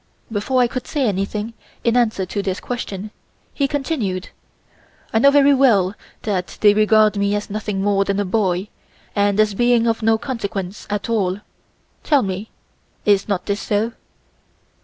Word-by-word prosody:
Before 250 +5 +1
I - - +3
could 255 0 -5
say 285 -3 0
anything 205 +3 -2 0.3
in 235 0 +2
answer 220 -6 +2
to 200 +2 -3
this 190 -1 -2
question 210 -4 -5 0.4
he 280 - +1
continued: 260 - -2 0.8
"I 225 - +4
know 280 - +7
very 285 0 +5
well 215 -9 +4 0.3
that 190 -4 -2
they 205 -1 +7
regard 215 0 +4
me 200 0 +1
as 205 0 -4
nothing 210 -2 -2
more 200 -1 +2
than 200 0 -1
a 205 - 0
boy, 190 -1 0 0.5
and 205 0 +2
as 215 -1 +3
being 240 +2 +3
of 225 -1 0
no 225 0 +3
consequence 205 -6 -5
at 205 0 -2
all. 205 -4 0 0.6
Tell 290 -4 +3
me, 195 +2 -4 0.6
is 200 -2 +3
not 200 -4 -1
this 200 0 -2
so?" 215 +2 0
210 Hz, 160 wpm, -20 LUFS, 200-235 Hz, 0.8 s, know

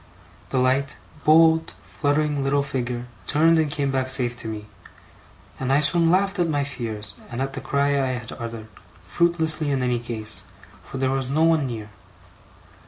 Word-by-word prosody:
The - - -1
light, 130 +2 +1 0.3
bold, 160 +1 +5
fluttering 145 -1 0
little 140 +1 +2
figure 125 -3 -3 0.2
turned 160 +2 +4
and 155 -2 +1
came 140 -1 -1
back 130 -1 0
safe 125 -2 +2
to 115 - -6
me, 105 -1 -5 0.9
and 130 0 -1
I 140 - +5
soon 165 +3 +3
laughed 195 +2 +2
at 170 -1 +2
my 145 -2 +1
fears, 110 -7 -5 0.2
and 120 - -5
at 135 0 -2
the 135 - -5
cry 140 0 +1
I 135 -2 +1
had 120 -2 -6
uttered; 115 -2 -7 0.4
fruitlessly 160 -3 +1
in 135 -2 0
any 125 -1 +1
case, 115 -2 -3 0.4
for - - -8
there 130 0 +1
was 135 -1 -1
no 155 +4 +2
one 160 -4 +3
near. 110 -3 -6
135 Hz, 170 wpm, -23 LUFS, 125-155 Hz, 0.9 s, bold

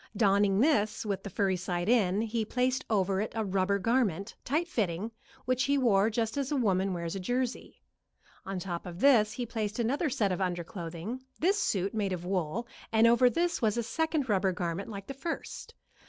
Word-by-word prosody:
Donning 200 -1 +3
this 220 -8 +2
with 200 -2 -2
the 200 - -7
furry 190 0 +1
side 175 0 -3
in, 210 -4 +3
he 225 0 -1
placed 250 +4 0
over 195 -2 +1
it 215 - -3
a 220 -1 -1
rubber 195 +1 +1
garment, 210 -2 0
tight 315 +6 0
fitting, 205 - -2 0.3
which 255 0 +1
he 280 0 +2
wore 220 -5 +3
just 225 +2 -1
as 275 0 -1
a - - +1
woman 195 -6 +1
wears 170 0 -3
a - - -3
jersey. 245 +6 -3 0.6
On 195 0 -4
top 175 -1 -4
of 175 0 -8
this 225 -5 +5
he 245 - -3
placed 220 -2 -3
another 270 +7 0
set 225 -7 +1
of 185 - -2
under 175 -2 -1
clothing, 175 +8 -6 0.2
this 390 +5 +2
suit 195 0 0
made 205 -3 -1
of 175 -1 -5
wool, 185 +4 -2 0.2
and 225 0 +5
over 240 +2 +6
this 340 +4 0
was 220 -1 +1
a 235 - 0
second 310 +3 -1
rubber 195 -3 +2
garment 175 +2 -3
like 200 -2 -7
the 275 - -6
first. 300 +5 -6
210 Hz, 200 wpm, -30 LUFS, 190-245 Hz, 0.6 s, over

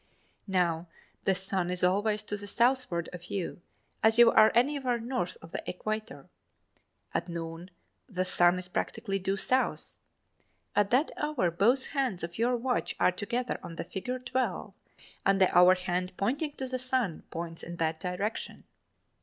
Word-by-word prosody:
Now, 175 -3 +1 0.4
the 190 - +3
sun 190 -1 -1
is 180 0 -2
always 205 +4 +2
to 205 - -4
the 205 0 -7
southward 235 -7 +1
of 180 0 -8
you 180 -1 -4 0.4
as 220 +1 +4
you 235 -1 +8
are 220 0 +7
anywhere 255 -1 +2
north 230 -7 -3
of 165 - -11
the - - -3
equator. 215 +5 -4 0.9
At - - -1
noon, 165 +1 -6 0.4
the 185 -3 -1
sun 175 0 +4
is 180 0 -4
practically 195 +2 -2
due 195 +1 -1
South. 255 +6 0 0.8
At 205 -1 +3
that 260 +7 +3
hour, 295 - 0
both 235 +10 +3
hands 260 - -1
of 170 +4 -6
your 245 +2 +2
watch 250 +1 -1
are - - +5
together 235 +6 -2
on 165 - -8
the - - -4
figure 205 +8 -4
12 245 -5 -2 0.5
and 195 0 +3
the 190 - +3
hour 180 +1 +8
hand 180 0 -2
pointing 285 +9 -1
at - - -32
the 255 - -1
sun 250 -9 -1
points 165 0 -5
in 170 - -6
that 160 -1 -1
direction. 185 +5 -3
195 Hz, 160 wpm, -30 LUFS, 180-240 Hz, 0.9 s, you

